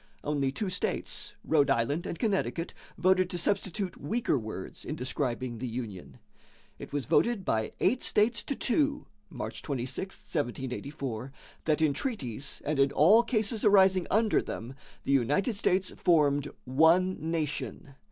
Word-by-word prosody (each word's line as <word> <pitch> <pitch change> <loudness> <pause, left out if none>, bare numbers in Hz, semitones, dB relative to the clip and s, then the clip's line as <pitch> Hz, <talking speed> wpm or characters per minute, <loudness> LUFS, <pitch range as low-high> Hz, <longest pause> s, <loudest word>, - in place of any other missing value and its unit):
Only 140 -2 0
two 185 +7 -3
states 180 - -2
Rhode 145 -3 +3
Island 135 +5 +1
and - - -4
Connecticut 195 -6 -1 0.2
voted 185 +1 +3
to 175 - -3
substitute 190 +1 -1
weaker 225 +7 0
words 110 -6 -5
in 150 - -4
describing 125 -3 -3
the 130 - -3
union. 115 -6 -6 0.6
It - - -9
was 145 -3 -2
voted 225 - +2
by 110 -1 0
eight 255 - +2
states 230 +3 +3
to 280 - -2
two 285 +4 0 0.2
(March - - -6
26, 135 +7 -3
1784) 130 -2 -4 0.3
that 155 0 +2
in 150 -2 +3
treaties 140 - -4
and 150 -1 -1
in 135 0 +4
all 190 +12 +6
cases 220 -2 0
arising 190 -3 +5
under 220 +1 +3
them, 120 +4 -6 0.3
the - - -1
United 140 - +2
States 190 -2 +1
formed 145 -4 +2 0.2
"one 165 +8 +4
nation." 145 - -3
155 Hz, 140 wpm, -29 LUFS, 135-195 Hz, 0.6 s, all